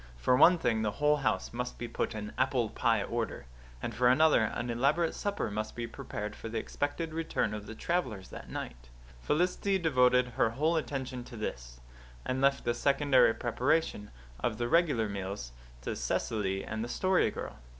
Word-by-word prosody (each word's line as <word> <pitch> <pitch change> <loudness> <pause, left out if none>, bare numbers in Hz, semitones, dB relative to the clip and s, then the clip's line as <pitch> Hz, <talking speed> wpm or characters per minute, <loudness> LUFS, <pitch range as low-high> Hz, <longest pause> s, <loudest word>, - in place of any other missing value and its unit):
For 125 - +3
one 175 +7 +7
thing, 115 -8 +1
the 105 -2 0
whole 150 +1 +3
house 135 -5 -1
must 125 +1 -4
be 120 - -4
put 115 - -2
in 105 0 -5
apple 130 -3 +1
pie - - +2
order; - - -3 0.4
and - - -3
for 120 +3 +3
another, 150 +1 +5
an 120 +2 -3
elaborate 145 +8 +2
supper 205 - -2
must 110 +1 -4
be 120 - -3
prepared 105 -2 -6
for 115 - -7
the 115 - -3
expected 150 +7 -3
return 160 -9 -1
of 105 -1 -6
the 110 - -7
travellers 125 - -2
that - - -9
night. - - -7 0.3
Felicity 180 - +1
devoted 125 -6 +3
her 115 - +1
whole 150 +8 +1
attention 130 -5 -3
to 120 - -10
this, - - -5 0.5
and 130 +1 -1
left 140 0 +3
the 120 - +1
secondary 140 -4 +4
preparation 125 -2 0 0.3
of 110 - -1
the 120 - -1
regular 145 -7 +3
meals 95 -10 -5 0.3
to - - -3
Cecily 95 -3 -1
and 110 0 -3
the 120 - -5
Story 185 +7 +2
Girl. - - -7
125 Hz, 180 wpm, -31 LUFS, 110-145 Hz, 0.5 s, one